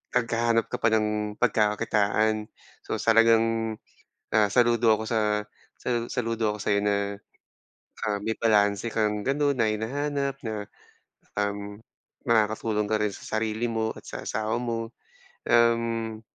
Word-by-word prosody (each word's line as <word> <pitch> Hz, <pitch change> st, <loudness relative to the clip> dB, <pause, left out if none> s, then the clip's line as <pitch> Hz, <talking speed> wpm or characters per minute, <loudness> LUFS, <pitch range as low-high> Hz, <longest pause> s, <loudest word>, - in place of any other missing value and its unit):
naghahanap 115 Hz, -1 st, +1 dB
ka -, -, -1 dB
pa 110 Hz, -, +4 dB
ng 105 Hz, -1 st, -1 dB
pagkakakitaan. 105 Hz, -1 st, +1 dB, 0.4 s
So, -, -, -1 dB
talagang, 115 Hz, 0 st, +3 dB, 0.6 s
ah, 105 Hz, -1 st, +5 dB
saludo 120 Hz, -2 st, +4 dB
ako 110 Hz, -, -4 dB
sa 110 Hz, -2 st, +1 dB, 0.6 s
sal 120 Hz, -1 st, -2 dB
saludo 115 Hz, -3 st, -1 dB
ako 105 Hz, -, -10 dB
sa'yo 100 Hz, -1 st, +2 dB
na, 105 Hz, 0 st, +2 dB, 1.1 s
ah, 105 Hz, -1 st, 0 dB
may 110 Hz, -, 0 dB
balanse 105 Hz, 0 st, +2 dB
kang 105 Hz, -1 st, 0 dB
ganun, 140 Hz, 0 st, +1 dB
na 110 Hz, -2 st, +3 dB
hinahanap 140 Hz, +4 st, -2 dB
na, 105 Hz, -2 st, -4 dB, 0.7 s
um, 100 Hz, 0 st, -3 dB, 0.5 s
makakatulong 110 Hz, -1 st, +2 dB
ka 110 Hz, -, +3 dB
rin 105 Hz, -2 st, 0 dB
sa -, -, -11 dB
sarili 110 Hz, +1 st, -1 dB
mo 110 Hz, 0 st, -1 dB
at -, -, -12 dB
sa -, -, -6 dB
asawa 110 Hz, +1 st, -1 dB
mo, 115 Hz, -1 st, -3 dB, 0.6 s
um, 115 Hz, -1 st, +2 dB
110 Hz, 130 wpm, -26 LUFS, 105-115 Hz, 1.1 s, ah